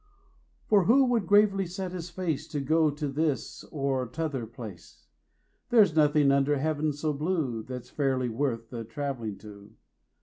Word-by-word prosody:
For 200 -4 +4
who 265 +7 +5
would 235 -7 +1
gravely 200 -2 +4
set 185 +1 -5
his 180 -1 -6
face 160 -5 -3
To 145 - -3
go 155 +3 +3
to 145 +1 -3
this 145 +1 -2
or 135 -3 -2
t'other 135 -3 -3
place? 110 -6 -11 0.6
There's 210 -9 +5
nothing 150 -2 +4
under 140 +1 +2
Heav'n 155 +1 0
so 150 +1 -2
blue 150 -6 -1
15 - - -14
That's 125 -1 -7
fairly 135 -3 0
worth 115 -1 -2
the 115 -2 -5
travelling 115 -3 -4
to. 105 0 -13
145 Hz, 160 wpm, -28 LUFS, 125-165 Hz, 0.6 s, who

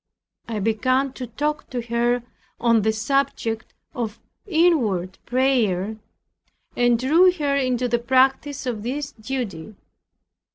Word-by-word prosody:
I 225 - -2
began 255 +6 +1
to 255 -2 -6
talk 295 +6 -3
to 250 - -3
her 235 +1 0 0.4
on 230 -2 +3
the 220 +2 +2
subject 225 -1 -1 0.2
of 230 -3 -4 0.3
inward 255 - +2
prayer, 220 -6 +1 0.8
and 245 -1 +3
drew 320 +9 +5
her 290 -5 0
into 255 -2 +1
the 240 0 +1
practice 265 +3 +2
of 235 -4 -3
this 280 +5 -3
duty. 215 - -5
245 Hz, 120 wpm, -23 LUFS, 220-270 Hz, 0.8 s, drew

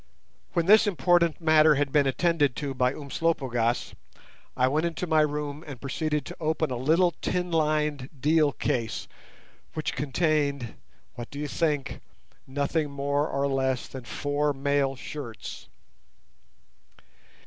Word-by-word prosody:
When 170 -2 +1
this 215 +3 +6
important 175 -3 +2
matter 155 -2 +5
had 140 0 0
been 145 -1 +3
attended 145 -2 +2
to 140 -2 -3
by 125 -1 +2
Umslopogaas, 135 -5 -1 0.6
I 130 - +4
went 155 +5 +1
into 170 +1 -3
my 160 -2 +3
room 150 0 -2
and 135 -4 -8
proceeded 150 +2 -2
to - - -8
open 160 -2 0
a - - -1
little 160 +8 +3
tin 180 -1 -1
lined 150 -4 0
deal 150 +1 +3
case, 115 -4 -2 0.7
which 155 - -2
contained—what 140 -5 -2
do 140 - -9
you 150 +1 -3
think?—nothing 145 0 -3
more 140 +1 0
or 140 +1 0
less 130 -2 0
than 130 -2 -9
four 145 +4 -1
mail 140 0 0
shirts. 125 -5 -8
145 Hz, 125 wpm, -27 LUFS, 135-160 Hz, 0.7 s, this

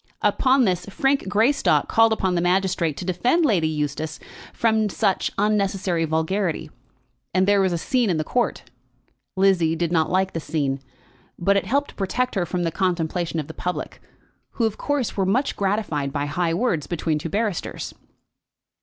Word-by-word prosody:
Upon 260 -1 +3
this, 180 -2 -1
Frank 270 +5 0
Greystock 225 +8 +2
called 225 0 +4
upon 190 -4 +1
the 175 - +1
magistrate 180 -3 +1
to 180 - -5
defend 245 - +2
Lady 180 - +2
Eustace 155 +1 -3 0.3
from 220 -2 +1
such 195 -2 0
unnecessary 195 -4 +1
vulgarity, 160 0 -1 0.6
and 185 +1 +3
there 200 -1 +4
was 190 -1 +2
a 170 - 0
scene 245 - +1
in 175 - +1
the 155 - 0
court. 245 +9 -1 0.7
Lizzie 185 -4 +3
did 170 0 -1
not 160 -2 +2
like 190 +1 +1
the 165 - -2
scene, 145 -4 -2 0.6
but 195 +3 +2
it 200 - 0
helped 280 +3 +1
to - - -24
protect 245 +6 -1
her 180 -4 -1
from 180 +1 -2
the 165 - 0
contemplation 170 -2 -1
of 150 - -3
the 160 - -9
public, 180 +2 -4 0.5
who 230 - 0
of 220 -2 -1
course 290 -5 -1
were 195 - +1
much 230 +9 +1
gratified 190 -9 -1
by 145 0 -2
high 165 +3 -1
words 175 - 0
between 160 -2 -1
two 165 - -5
barristers. 205 -1 -2
185 Hz, 170 wpm, -23 LUFS, 165-215 Hz, 0.7 s, called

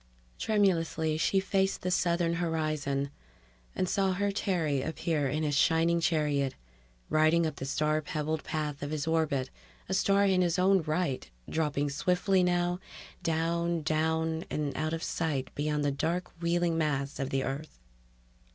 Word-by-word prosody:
Tremulously 165 -7 +1
she 195 +4 +3
faced 195 0 0
the 180 - 0
southern 170 -1 +2
horizon... 155 -4 -1 0.6
and 185 - 0
saw 195 0 +1
her 200 +2 0
Terry 165 -8 0
appear 155 -1 -1
in 155 +4 -1
his 150 -1 0
shining 165 +3 +3
chariot, 145 -5 +1 0.6
riding 155 +2 +4
up 155 -3 -3
the 135 - -4
star 155 +2 +1
pebbled 155 +1 -2
path 150 -2 -3
of 145 - -3
his 155 -1 -2
orbit, 155 -5 0 0.4
a 190 - -2
star 200 +1 +3
in 190 -2 +3
his 175 -1 +1
own 190 +1 +4
right, 155 - -1 0.2
dropping 145 -2 0
swiftly 180 +5 +2
now, 175 0 +1 0.4
down, 165 0 0
down, 160 +1 0
and 150 -2 -2
out 155 +1 -1
of 165 - -3
sight 145 -5 -2
beyond 150 0 -1
the 145 - +2
dark 170 +6 -2
wheeling 170 -1 +1
mass 140 -3 -1
of 135 -1 -2
the 135 0 0
Earth 140 +4 -5
160 Hz, 150 wpm, -30 LUFS, 150-175 Hz, 0.6 s, riding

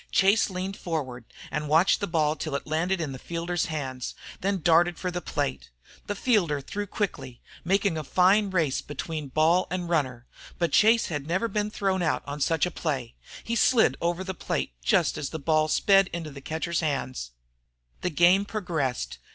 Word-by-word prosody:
Chase 200 +4 +4
leaned 190 +1 -4
forward 130 -8 -4 0.3
and 150 +1 -3
watched 160 +5 +4
the 200 - -2
ball 155 -3 +1
till 155 -3 -4
it 140 - -3
landed 175 +5 0
in 155 -4 -3
the 130 - -7
fielder's 170 +2 -2
hands, 130 -5 -4 0.2
then 200 +1 0
he 185 - -5
darted 170 +1 +4
for 180 - -3
the 180 0 -3
plate. 65 - -3 0.4
The 205 - -2
fielder 190 - +2
threw 205 +9 -5
quickly, 180 - -4 0.2
making 195 -2 +1
a - - -4
fine 190 +7 +3
race 160 -8 0
between 150 +1 -5
ball 160 +6 +3
and 180 -1 -3
runner. 130 -8 -1 0.3
But 170 -1 0
Chase 225 +2 +4
had 145 -3 -4
never 185 +7 0
yet 230 - -4
been 210 -1 0
thrown 195 -3 -1
out 160 -3 0
on 145 +1 -6
such 165 +2 +2
a 180 - -3
play. 135 -8 -3 0.3
He 230 - -2
slid 235 0 +4
over 175 +2 0
the 190 0 -4
plate 175 - -3
just - - +2
as 140 - -3
the 160 - -5
ball 155 +1 +2
sped 195 +4 +4
into 165 -3 -5
the 140 0 -10
catcher's 160 +4 -2
hands. 135 - -2 0.7
The - - 0
game 175 +4 +4
progressed. 165 - -3
170 Hz, 190 wpm, -26 LUFS, 150-190 Hz, 0.7 s, Chase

